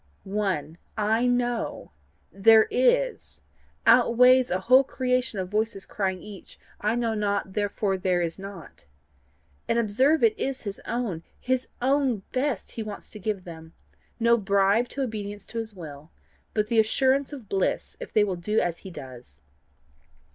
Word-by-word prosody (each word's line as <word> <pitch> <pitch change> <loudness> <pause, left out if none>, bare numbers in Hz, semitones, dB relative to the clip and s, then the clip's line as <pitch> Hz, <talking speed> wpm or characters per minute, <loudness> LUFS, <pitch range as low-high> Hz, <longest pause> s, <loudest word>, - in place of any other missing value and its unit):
One 190 -6 -2 0.2
I 220 +3 +2
KNOW: 245 -1 -1 0.4
THERE 220 +2 +6
IS - - +1 0.4
outweighs 250 +2 +6
a 185 +1 -1
whole 255 +6 +6
creation 255 -3 -1
of 185 -1 -3
voices 210 -1 -1
crying 190 -2 -3
each 205 -2 -11 0.2
I 215 +2 0
KNOW 235 -2 0
NOT, 200 -2 -1
THEREFORE 205 -1 -1
THERE 180 -1 +1
IS 165 +2 -3
NOT. 195 - -11 0.8
And 230 - +1
observe 255 - +2
it 450 -2 +5
is 270 0 -2
his 200 -2 -6
own, 230 -9 -2 0.2
his 255 0 -1 0.2
own 265 -6 +1
best 260 -4 -1
he 230 - -5
wants 210 -2 -8
to 215 - -9
give 200 -1 -3
them 160 -2 -11 0.5
no 235 0 +4
bribe 200 +3 +2
to 275 - -3
obedience 205 -4 -5
to 230 - -5
his 220 -2 -6
will, 155 -3 -10 0.5
but 210 -1 +2
the 225 +1 +2
assurance 265 +5 +2
of 265 -7 -9
bliss 190 -1 -1
if - - -8
they 215 - +4
will 195 -3 -1
do 210 +5 0
as 170 -1 -1
he 190 - -9
does. 125 - -11
215 Hz, 155 wpm, -26 LUFS, 195-245 Hz, 0.8 s, THERE